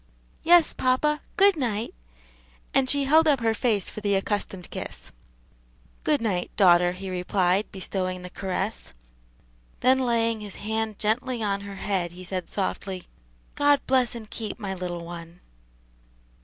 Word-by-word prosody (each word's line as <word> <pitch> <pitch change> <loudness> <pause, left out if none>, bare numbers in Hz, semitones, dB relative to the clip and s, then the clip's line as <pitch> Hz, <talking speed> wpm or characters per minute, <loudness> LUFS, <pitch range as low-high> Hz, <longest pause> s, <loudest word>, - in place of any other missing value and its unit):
"Yes, 340 -1 +6
papa; 300 +4 +1 0.2
good 400 -1 +6
night," 230 -6 -2 0.8
and 265 -1 +3
she 285 0 +3
held 315 +4 +5
up 285 -4 +4
her 225 -1 +2
face 220 -4 0
for 215 - -6
the 205 -1 +2
accustomed 195 -2 -2
kiss. - - -7 0.9
"Good 300 -4 +2
night, 185 -5 -1
daughter," 175 -2 +5
he 190 +1 -6
replied, 185 +2 +1
bestowing 185 -1 -3
the 180 - -8
caress. 195 - -3 0.9
Then 260 +1 +5
laying 230 -3 +1
his 205 -2 -8
hand 220 0 -2
gently 235 +2 0
on 200 -1 0
her 200 0 -8
head, 185 -4 -2
he 180 +1 -10
said 185 0 -4
softly, 190 -1 -3 0.5
"God 290 -1 +4
bless 255 -3 +2
and 225 -2 -7
keep 220 0 -5
my 200 -5 -4
little 175 -2 -5
one." 170 0 -9
210 Hz, 145 wpm, -26 LUFS, 185-250 Hz, 0.9 s, Yes